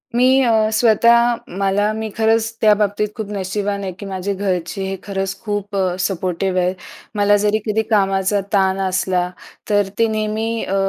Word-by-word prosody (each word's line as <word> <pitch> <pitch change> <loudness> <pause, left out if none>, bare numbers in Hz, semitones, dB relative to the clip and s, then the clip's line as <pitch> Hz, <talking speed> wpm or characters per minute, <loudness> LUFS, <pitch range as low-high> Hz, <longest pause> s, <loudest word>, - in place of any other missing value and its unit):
मी 245 +1 +4 0.2
अ, 220 -3 +3
स्वतः 235 +1 +4 0.2
मला 200 +2 +1
मी 220 0 -4
खरंच 225 +1 +1
त्याबाबतीत 210 -1 +3
खूप 220 -3 -5
नशिबवान 200 +1 -3
आहे, 190 - -3
की 205 - -7
माझे 195 0 -3
घरचे 185 -1 -2
हे 195 - -3
खरंच 195 -1 -3
खूप 205 -1 -3
अ, 185 -2 0
सपोर्टिव्ह 185 0 -1
आहेत. 180 +1 0 0.4
मला 205 0 +4
जरी 210 +1 +2
कधी 215 +1 +1
कामाचा 195 -1 +2
ताण 190 -1 +2
असला, 185 -1 0 0.4
तर 205 -2 +2
ते 230 - +4
नेहमी 220 +1 -2
अ, 195 - -2
205 Hz, 160 wpm, -19 LUFS, 190-215 Hz, 0.4 s, मी